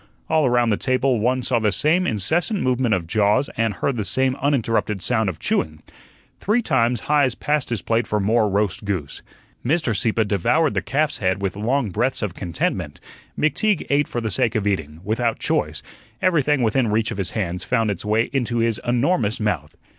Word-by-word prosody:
All 155 Hz, -3 st, +3 dB
around 120 Hz, -2 st, +2 dB
the 105 Hz, -, +2 dB
table 130 Hz, -1 st, +1 dB
one 125 Hz, +3 st, +1 dB
saw 120 Hz, -2 st, +1 dB
the 110 Hz, -2 st, +1 dB
same 165 Hz, -, +2 dB
incessant 160 Hz, -, 0 dB
movement 125 Hz, -3 st, +2 dB
of 90 Hz, -3 st, -3 dB
jaws 105 Hz, -, +1 dB
and 115 Hz, -1 st, +1 dB
heard 120 Hz, +7 st, -2 dB
the 110 Hz, -, -1 dB
same 130 Hz, +7 st, 0 dB
uninterrupted 115 Hz, -7 st, 0 dB
sound 110 Hz, +1 st, 0 dB
of 85 Hz, -, -5 dB
chewing. 75 Hz, 0 st, -2 dB, 0.6 s
Three 225 Hz, +4 st, +1 dB
times 120 Hz, -, +1 dB
Heise 145 Hz, -5 st, +2 dB
passed 150 Hz, -2 st, -1 dB
his 115 Hz, -7 st, -2 dB
plate 115 Hz, +1 st, 0 dB
for 105 Hz, -, 0 dB
more 110 Hz, +2 st, +2 dB
roast 100 Hz, 0 st, 0 dB
goose. 95 Hz, -9 st, -4 dB, 0.4 s
Mr. 140 Hz, -4 st, +1 dB
Sieppe 110 Hz, +1 st, +1 dB
devoured 120 Hz, -, +1 dB
the -, -, 0 dB
calf's 150 Hz, -2 st, -1 dB
head 95 Hz, -2 st, 0 dB
with 95 Hz, -, -1 dB
long 115 Hz, +2 st, 0 dB
breaths 120 Hz, +5 st, -1 dB
of 100 Hz, -5 st, -2 dB
contentment; 75 Hz, -5 st, -3 dB, 0.4 s
McTeague 160 Hz, +6 st, +1 dB
ate 145 Hz, 0 st, +3 dB
for 120 Hz, -, -3 dB
the 110 Hz, -2 st, -2 dB
sake 120 Hz, -3 st, +1 dB
of 105 Hz, -2 st, 0 dB
eating, 80 Hz, -6 st, -2 dB
without 115 Hz, +3 st, 0 dB
choice; -, -, -1 dB, 0.4 s
everything 150 Hz, -6 st, +2 dB
within 115 Hz, +2 st, +2 dB
reach 110 Hz, +1 st, 0 dB
of -, -, -5 dB
his 95 Hz, -, -1 dB
hands 90 Hz, -3 st, -2 dB
found 115 Hz, -4 st, +1 dB
its 95 Hz, -, -5 dB
way 110 Hz, +2 st, +1 dB
into 120 Hz, -3 st, -1 dB
his 115 Hz, -2 st, 0 dB
enormous 120 Hz, -, +1 dB
mouth. 90 Hz, -9 st, -2 dB
115 Hz, 190 wpm, -22 LUFS, 105-130 Hz, 0.6 s, All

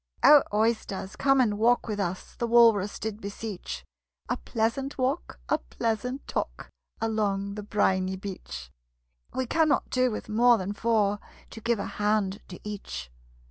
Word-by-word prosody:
"O, 295 Hz, -1 st, +9 dB
Oysters, 210 Hz, -2 st, 0 dB
come 270 Hz, +3 st, +3 dB
and 210 Hz, -5 st, +2 dB
walk 240 Hz, +2 st, +3 dB
with 210 Hz, -2 st, -3 dB
us!" 185 Hz, -1 st, -3 dB
The 235 Hz, -, -2 dB
Walrus 225 Hz, -4 st, +5 dB
did 220 Hz, 0 st, -5 dB
beseech. 200 Hz, -1 st, -6 dB, 0.4 s
"A -, -, +1 dB
pleasant 230 Hz, -, -2 dB
walk, 260 Hz, -, -1 dB
a -, -, +2 dB
pleasant 230 Hz, -, -3 dB
talk, -, -, -4 dB, 0.3 s
Along 200 Hz, -3 st, 0 dB
the 210 Hz, -, -5 dB
briny 190 Hz, -2 st, +1 dB
beach: 65 Hz, -, -7 dB, 0.6 s
We 260 Hz, -, 0 dB
cannot 310 Hz, +3 st, +2 dB
do 255 Hz, 0 st, +3 dB
with 215 Hz, -, -5 dB
more 235 Hz, +2 st, +5 dB
than 195 Hz, 0 st, -3 dB
four, 210 Hz, -2 st, +1 dB, 0.3 s
To 225 Hz, -, -9 dB
give 235 Hz, +1 st, +1 dB
a 200 Hz, -, -3 dB
hand 205 Hz, -2 st, 0 dB
to 180 Hz, -, -9 dB
each." 65 Hz, -, -6 dB
215 Hz, 150 wpm, -27 LUFS, 195-235 Hz, 0.6 s, O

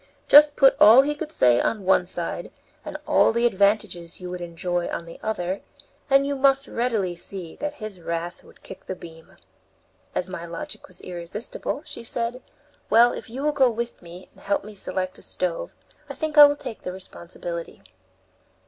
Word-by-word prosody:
Just 295 Hz, 0 st, +8 dB
put 270 Hz, -1 st, +6 dB
all 230 Hz, +6 st, +9 dB
he 295 Hz, +1 st, -1 dB
could 305 Hz, +1 st, -6 dB
say 120 Hz, -, +4 dB
on 210 Hz, -4 st, -1 dB
one 180 Hz, -1 st, +3 dB
side, 175 Hz, -2 st, -5 dB, 0.3 s
and -, -, -6 dB
all -, -, +4 dB
the 235 Hz, +1 st, +1 dB
advantages 200 Hz, -5 st, +1 dB
you 180 Hz, -1 st, -7 dB
would 180 Hz, 0 st, -6 dB
enjoy 175 Hz, +1 st, -2 dB
on 170 Hz, -, -4 dB
the 165 Hz, -, -11 dB
other, 190 Hz, -3 st, -2 dB, 0.5 s
and 275 Hz, 0 st, +5 dB
you 280 Hz, 0 st, -1 dB
must 275 Hz, 0 st, +3 dB
readily 225 Hz, -7 st, -1 dB
see 175 Hz, -1 st, -8 dB
that 295 Hz, 0 st, -4 dB
his 215 Hz, -7 st, -8 dB
wrath 170 Hz, +1 st, -4 dB
would -, -, -20 dB
kick -, -, -11 dB
the 190 Hz, -, -4 dB
beam." 165 Hz, -2 st, -13 dB, 0.8 s
As 180 Hz, -, -1 dB
my 185 Hz, -2 st, -6 dB
logic 170 Hz, -1 st, -7 dB
was 185 Hz, -1 st, -14 dB
irresistible, 180 Hz, -, -5 dB
she 290 Hz, -5 st, -8 dB
said, 235 Hz, +2 st, -3 dB, 0.5 s
"Well, 235 Hz, +2 st, +6 dB
if -, -, -8 dB
you 260 Hz, +5 st, -5 dB
will 300 Hz, -, +2 dB
go 270 Hz, -3 st, +4 dB
with 235 Hz, +1 st, -5 dB
me, 175 Hz, +1 st, -11 dB
and -, -, -20 dB
help 200 Hz, +1 st, -1 dB
select 185 Hz, -1 st, -4 dB
a -, -, -15 dB
stove, -, -, -4 dB, 0.3 s
I -, -, -6 dB
think 310 Hz, -1 st, -3 dB
I 295 Hz, -1 st, +11 dB
will 290 Hz, 0 st, +3 dB
take 230 Hz, -, -7 dB
the 180 Hz, -, -5 dB
responsibility." 170 Hz, -, -8 dB
200 Hz, 185 wpm, -24 LUFS, 175-265 Hz, 0.8 s, I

